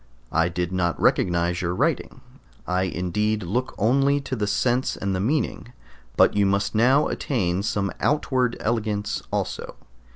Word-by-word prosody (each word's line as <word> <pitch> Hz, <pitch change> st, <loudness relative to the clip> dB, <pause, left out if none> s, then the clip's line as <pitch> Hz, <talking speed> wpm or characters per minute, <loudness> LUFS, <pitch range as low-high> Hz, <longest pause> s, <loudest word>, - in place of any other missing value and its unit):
I 80 Hz, +1 st, +2 dB
did 90 Hz, 0 st, -3 dB
not 85 Hz, -3 st, 0 dB
recognize 85 Hz, 0 st, +2 dB
your 90 Hz, 0 st, -1 dB
writing; -, -, -1 dB, 0.4 s
I 90 Hz, +1 st, 0 dB
indeed 95 Hz, +5 st, -1 dB
look 120 Hz, +9 st, -2 dB
only 135 Hz, +6 st, +3 dB
to 135 Hz, -1 st, -4 dB
the 105 Hz, -3 st, -1 dB
sense 125 Hz, +4 st, 0 dB
and 100 Hz, -1 st, -2 dB
meaning, 125 Hz, -2 st, -1 dB, 0.4 s
but -, -, +5 dB
you 100 Hz, -1 st, +3 dB
must 100 Hz, +1 st, 0 dB
now 130 Hz, +7 st, +4 dB
attain 95 Hz, -9 st, -1 dB
some 100 Hz, -2 st, -1 dB
outward 130 Hz, -4 st, +1 dB
elegance 105 Hz, -2 st, -1 dB
also. -, -, -3 dB
105 Hz, 140 wpm, -24 LUFS, 90-125 Hz, 0.4 s, but